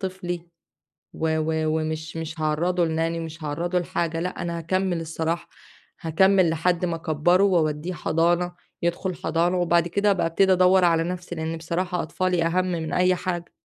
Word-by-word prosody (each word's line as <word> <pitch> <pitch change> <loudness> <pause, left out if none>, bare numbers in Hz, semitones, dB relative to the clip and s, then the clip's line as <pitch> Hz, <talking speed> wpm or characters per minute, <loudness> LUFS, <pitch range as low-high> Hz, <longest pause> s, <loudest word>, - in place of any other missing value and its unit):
طفلي 175 -3 -4 0.7
و 160 0 0
و 160 0 0
ومش 155 +1 -4
مش 160 0 -5
هاعرَّضه 170 +4 +1
لNanny 165 +1 -1
ومش 160 -1 -7
هاعرَّضه 175 +5 -1
لحاجة، 165 -1 -2
لأ 180 +1 -3
أنا 170 -1 -3
هاكمّل 185 +1 -1
الصراحة، 165 +1 -3 0.5
هاكمّل 185 +2 +3
لحد 170 +2 0
ما 170 -2 -1
أكبَّره 165 +4 +2
وأودّيه 165 -2 +1
حضانة، 170 +2 +1 0.3
يدخل 175 +2 -1
حضانة، 175 +3 0
وبعد 170 -1 +2
كده 200 +3 +2
أبقى 190 -4 +1
ابتدي 190 +3 +3
أدوَّر 185 0 +5
على 165 -1 +3
نَفسي 180 0 -5
لأن 160 0 -3
بصراحة 175 +2 -2
أطفالي 180 +2 0
أهم 180 +2 +1
من 160 -2 -3
أي 180 0 +3
حاجة. 175 -1 -4
170 Hz, 160 wpm, -24 LUFS, 160-180 Hz, 0.7 s, أدوَّر